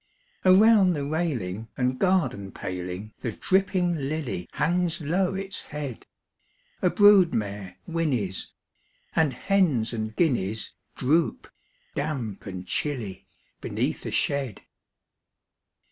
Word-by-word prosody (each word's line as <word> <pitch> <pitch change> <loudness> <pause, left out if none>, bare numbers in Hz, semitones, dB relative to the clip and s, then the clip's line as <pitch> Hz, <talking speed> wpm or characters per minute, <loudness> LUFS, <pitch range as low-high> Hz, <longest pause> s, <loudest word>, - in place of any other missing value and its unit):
Around 195 0 +6
the 145 -3 -2
railing 125 - -2
and 125 0 0
garden 130 - +1
paling 90 +4 -5
The 115 - -3
dripping 185 - +1 0.2
lily 145 - -3
hangs 175 +2 +1
low 180 +5 0
its 195 0 -2
head: 145 -5 -6 0.7
A 180 - +4
brood 205 -3 +6
mare 100 -3 -4
whinnies; 135 - -1 0.7
and 160 -3 +3
hens 150 - +1
and 110 -1 -3
guineas 110 - 0 0.2
Droop, 155 +6 +1 0.5
damp 135 -10 -3
and 95 -1 -6
chilly, 115 -4 -3 0.3
beneath - - -2
the - - -5
shed. 135 -7 -1
145 Hz, 105 wpm, -26 LUFS, 110-180 Hz, 0.7 s, Around